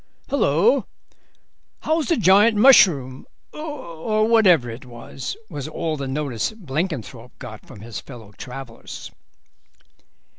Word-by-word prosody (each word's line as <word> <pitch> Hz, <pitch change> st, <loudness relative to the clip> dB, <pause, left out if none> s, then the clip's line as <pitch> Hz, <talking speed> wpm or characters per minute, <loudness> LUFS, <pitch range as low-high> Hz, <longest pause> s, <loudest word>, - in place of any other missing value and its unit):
"Hullo, 475 Hz, -, +2 dB, 0.9 s
how's 315 Hz, -1 st, 0 dB
the 335 Hz, -, +2 dB
giant 210 Hz, +2 st, +5 dB
mushroom, 155 Hz, -, +5 dB, 0.3 s
or 215 Hz, -, -2 dB
whatever 190 Hz, -, +4 dB
it 115 Hz, +3 st, -8 dB
was?" 125 Hz, +1 st, -8 dB
was 145 Hz, -7 st, -6 dB
all 155 Hz, 0 st, -3 dB
the 140 Hz, -2 st, -5 dB
notice 135 Hz, -, -2 dB
Blenkinthrope 145 Hz, -, -5 dB
got 110 Hz, -1 st, -10 dB
from 100 Hz, -, -12 dB
his 115 Hz, 0 st, -7 dB
fellow 115 Hz, -6 st, -12 dB
travellers. 125 Hz, +2 st, -9 dB
150 Hz, 110 wpm, -22 LUFS, -, 0.9 s, giant